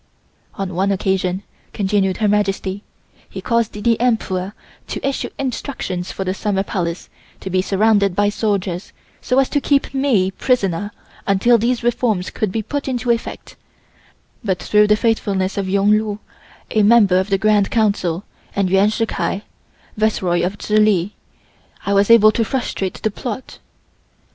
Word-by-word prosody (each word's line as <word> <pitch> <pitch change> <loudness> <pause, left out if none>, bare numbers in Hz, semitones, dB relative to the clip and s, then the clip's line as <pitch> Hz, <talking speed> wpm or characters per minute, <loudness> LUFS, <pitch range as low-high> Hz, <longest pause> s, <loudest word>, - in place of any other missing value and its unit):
"On 195 -2 -4
one 190 +3 +1
occasion," 190 -1 -1 0.3
continued 195 -2 0
Her 215 - +1
Majesty, 200 -1 0 0.5
"he - - -7
caused 230 -2 0
the 225 +2 +1
Emperor 200 -5 0 0.3
to - - -3
issue 275 - -2
instructions 245 -8 -4
for 195 - -4
the 185 0 -1
Summer 195 0 -1
Palace 175 -3 -3 0.3
to 190 - -6
be 185 0 +2
surrounded 200 -1 +2
by 205 +1 +3
soldiers 200 -4 -2 0.3
so 250 - 0
as 270 -1 +4
to 290 - 0
keep 280 -1 +1
me 250 -9 +2
prisoner 205 -3 0 0.4
until 220 +4 +4
these 240 +2 0
reforms 225 -6 0
could 215 -4 -2
be 220 +2 -2
put 285 +7 -4
into 250 -2 0
effect, 230 0 -4 0.9
but 190 -4 0
through 210 +3 +3
the 210 - +5
faithfulness 205 -4 0
of 195 -2 -2
Yung 200 +2 +3
Lu, 215 -1 +1 0.5
a 215 - +3
member 205 -4 +5
of 190 +2 -2
the 195 - +2
Grand 210 0 +2
Council, 200 -5 0 0.3
and 195 -2 0
Yuan 195 +2 +4
Shill 225 +1 0
Kai, 205 -2 -3 0.5
Viceroy 190 -5 +1
of 190 +3 -2
Chihli, 210 -3 +2 0.7
I 200 - 0
was 200 +1 +3
able 220 -2 +7
to 230 - 0
frustrate 215 -5 -3
the 220 - +1
plot. 245 +4 -6
205 Hz, 155 wpm, -19 LUFS, 190-225 Hz, 0.9 s, able